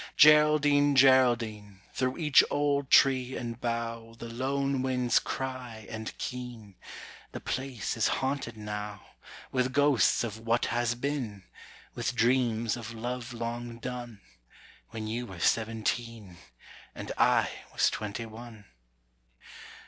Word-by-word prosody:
Geraldine, 150 Hz, -1 st, +6 dB
Geraldine, 120 Hz, -7 st, +3 dB
Through 130 Hz, 0 st, -1 dB
each 150 Hz, -4 st, +5 dB
old 145 Hz, -1 st, 0 dB
tree 130 Hz, -2 st, +4 dB
and 120 Hz, 0 st, -6 dB
bough 115 Hz, -1 st, -3 dB
The 115 Hz, -, -8 dB
lone 135 Hz, +2 st, -1 dB
winds 125 Hz, -2 st, +2 dB
cry 125 Hz, -4 st, -5 dB
and 110 Hz, -1 st, -6 dB
keen 120 Hz, -5 st, -6 dB, 0.6 s
The -, -, -5 dB
place 130 Hz, -3 st, -3 dB
is 115 Hz, -, +2 dB
haunted 130 Hz, -4 st, -2 dB
now, 105 Hz, -1 st, -6 dB, 0.5 s
With 130 Hz, 0 st, 0 dB
ghosts 145 Hz, -5 st, +3 dB
of 110 Hz, -2 st, -5 dB
what 115 Hz, +1 st, +1 dB
has 120 Hz, -1 st, 0 dB
been, 120 Hz, -7 st, -3 dB, 0.5 s
With -, -, -3 dB
dreams 115 Hz, -2 st, +2 dB
of 115 Hz, -1 st, -7 dB
love 120 Hz, +2 st, -4 dB
long 120 Hz, 0 st, -5 dB
done, 120 Hz, -3 st, -7 dB, 0.7 s
When 110 Hz, -1 st, -6 dB
you 120 Hz, +3 st, -3 dB
were 95 Hz, -4 st, -10 dB
seventeen, 110 Hz, -2 st, -1 dB, 0.6 s
And -, -, -6 dB
I -, -, +3 dB, 0.2 s
was -, -, +2 dB
twenty 105 Hz, +2 st, -4 dB
one. 110 Hz, -1 st, -11 dB
120 Hz, 120 wpm, -29 LUFS, 115-130 Hz, 0.7 s, Geraldine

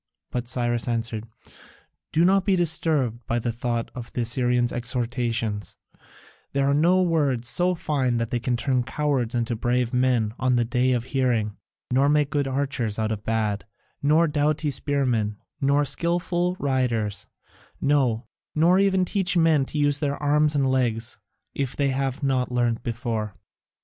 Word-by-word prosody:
But 125 Hz, -1 st, -3 dB
Cyrus 120 Hz, -1 st, 0 dB
answered: 115 Hz, -1 st, -2 dB, 0.8 s
"Do 165 Hz, +2 st, +3 dB
not 195 Hz, +1 st, +4 dB
be 195 Hz, -2 st, +2 dB
disturbed 155 Hz, -8 st, +1 dB
by 120 Hz, -, 0 dB
the 120 Hz, 0 st, -1 dB
thought 120 Hz, 0 st, -3 dB
of 120 Hz, -2 st, -8 dB
the 125 Hz, -, -1 dB
Assyrian's 120 Hz, +1 st, +1 dB
exhortations; 120 Hz, -3 st, -2 dB, 0.8 s
there 140 Hz, 0 st, +1 dB
are 140 Hz, -, +3 dB
no 175 Hz, +5 st, +4 dB
words 145 Hz, -8 st, +1 dB
so 180 Hz, +7 st, +1 dB
fine 140 Hz, -8 st, 0 dB
that 115 Hz, -1 st, -2 dB
they 120 Hz, -, 0 dB
can 120 Hz, 0 st, -1 dB
turn 130 Hz, 0 st, +1 dB
cowards 130 Hz, -2 st, -1 dB
into 120 Hz, 0 st, 0 dB
brave 120 Hz, +2 st, 0 dB
men 125 Hz, -4 st, +2 dB
on 130 Hz, -1 st, +2 dB
the 120 Hz, -1 st, +2 dB
day 125 Hz, +2 st, +1 dB
of 120 Hz, -2 st, 0 dB
hearing, 120 Hz, -6 st, 0 dB, 0.4 s
nor 135 Hz, +3 st, +3 dB
make 150 Hz, -1 st, +2 dB
good 145 Hz, -2 st, 0 dB
archers 130 Hz, -5 st, -2 dB
out 110 Hz, 0 st, -1 dB
of 105 Hz, -1 st, -4 dB
bad, 110 Hz, -2 st, -1 dB, 0.3 s
nor 155 Hz, +4 st, +4 dB
doughty 150 Hz, 0 st, 0 dB
spearmen, 125 Hz, -7 st, 0 dB, 0.2 s
nor 140 Hz, +1 st, +3 dB
skilful 175 Hz, +4 st, -1 dB
riders, 120 Hz, -7 st, -1 dB, 0.5 s
no, 130 Hz, -5 st, +1 dB, 0.3 s
nor 170 Hz, +4 st, +4 dB
even 190 Hz, -2 st, +3 dB
teach 185 Hz, -2 st, 0 dB
men 160 Hz, -4 st, +4 dB
to 150 Hz, -, -6 dB
use 145 Hz, -1 st, +2 dB
their 145 Hz, -2 st, -1 dB
arms 150 Hz, +1 st, +2 dB
and 135 Hz, -2 st, +2 dB
legs 120 Hz, -3 st, -1 dB, 0.3 s
if 135 Hz, -2 st, -3 dB
they 140 Hz, -1 st, +1 dB
have 135 Hz, +1 st, -2 dB
not 130 Hz, -2 st, 0 dB
learnt 120 Hz, -2 st, 0 dB
before." 115 Hz, -3 st, -3 dB
130 Hz, 160 wpm, -24 LUFS, 120-145 Hz, 0.8 s, not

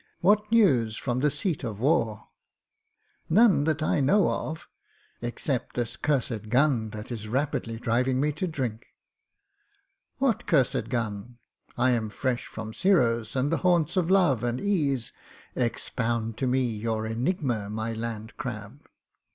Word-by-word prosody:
What 210 Hz, +3 st, +3 dB
news 130 Hz, -, +4 dB
from 125 Hz, -1 st, -2 dB
the 150 Hz, +3 st, +3 dB
seat 150 Hz, +2 st, -2 dB
of 110 Hz, -5 st, -4 dB
war?" 115 Hz, -6 st, +1 dB, 1.0 s
"None 195 Hz, -5 st, +5 dB
that 155 Hz, -1 st, 0 dB
I 155 Hz, -, +1 dB
know 180 Hz, +8 st, +4 dB
of 160 Hz, +1 st, -4 dB, 0.3 s
— -, -, -36 dB
except 120 Hz, +2 st, -2 dB
this 120 Hz, -1 st, -1 dB
cursed 120 Hz, -7 st, -1 dB
gun, 125 Hz, -3 st, +2 dB
that 105 Hz, +2 st, -8 dB
is 110 Hz, -3 st, -5 dB
rapidly 120 Hz, -2 st, -1 dB
driving 125 Hz, +2 st, +1 dB
me 150 Hz, +2 st, +2 dB
to 160 Hz, +5 st, -3 dB
drink." 130 Hz, -8 st, -4 dB, 1.3 s
"What 265 Hz, -5 st, 0 dB
cursed 130 Hz, -6 st, +2 dB
gun? 115 Hz, -1 st, -3 dB, 0.4 s
I 125 Hz, +1 st, +3 dB
am 115 Hz, -3 st, 0 dB
fresh 130 Hz, +2 st, -2 dB
from 110 Hz, 0 st, -7 dB
Giro's 115 Hz, -, +2 dB
and 135 Hz, +3 st, +1 dB
the 165 Hz, -, +2 dB
haunts 175 Hz, -4 st, +2 dB
of 180 Hz, -2 st, +1 dB
love 175 Hz, -, +3 dB
and 120 Hz, +1 st, -1 dB
ease. 145 Hz, -, 0 dB, 0.4 s
Expound 115 Hz, -2 st, -1 dB
to 130 Hz, -, -1 dB
me 130 Hz, +1 st, +2 dB
your 110 Hz, -1 st, -2 dB
enigma, 120 Hz, -, -1 dB
my 110 Hz, +2 st, -3 dB
Land 110 Hz, -1 st, -5 dB
Crab." 120 Hz, 0 st, -6 dB
125 Hz, 145 wpm, -27 LUFS, 115-150 Hz, 1.3 s, None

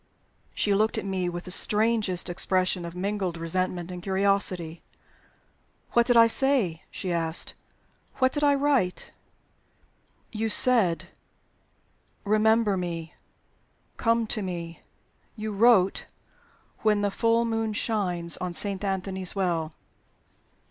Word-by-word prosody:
She 205 Hz, -, +1 dB
looked 215 Hz, +2 st, +2 dB
at -, -, -3 dB
me 185 Hz, -2 st, -1 dB
with 175 Hz, 0 st, -6 dB
the 180 Hz, -, -7 dB
strangest 210 Hz, -3 st, +1 dB
expression 185 Hz, 0 st, 0 dB
of 170 Hz, 0 st, -8 dB
mingled 190 Hz, -2 st, -2 dB
resentment 175 Hz, +1 st, -2 dB
and 180 Hz, -1 st, -7 dB
curiosity. 190 Hz, -3 st, 0 dB, 1.1 s
"What 235 Hz, 0 st, +3 dB
did 245 Hz, -2 st, +4 dB
I 230 Hz, -, +9 dB
say?" 230 Hz, -, +1 dB
she 185 Hz, -3 st, -4 dB
asked. 165 Hz, -1 st, 0 dB, 0.6 s
"What 260 Hz, -1 st, +2 dB
did 295 Hz, +1 st, -2 dB
I 285 Hz, -1 st, +5 dB
write?" 275 Hz, -10 st, 0 dB, 1.2 s
"You 225 Hz, 0 st, -2 dB
said, 215 Hz, -7 st, +3 dB, 1.1 s
'Remember 215 Hz, 0 st, +3 dB
me. 170 Hz, -3 st, -5 dB, 0.8 s
Come 230 Hz, -1 st, +2 dB
to 215 Hz, 0 st, -3 dB
me.' 170 Hz, -3 st, -6 dB, 0.5 s
You 215 Hz, -1 st, -4 dB
wrote, 200 Hz, -3 st, +4 dB, 0.8 s
'When 210 Hz, -2 st, +2 dB
the 205 Hz, -, +1 dB
full 230 Hz, +3 st, +2 dB
moon 225 Hz, -1 st, -1 dB
shines 180 Hz, -6 st, -1 dB
on 180 Hz, -1 st, -4 dB
Saint 200 Hz, -1 st, -2 dB
Anthony's 190 Hz, -1 st, -3 dB
Well.'" 170 Hz, -5 st, -1 dB
195 Hz, 120 wpm, -26 LUFS, 180-225 Hz, 1.2 s, I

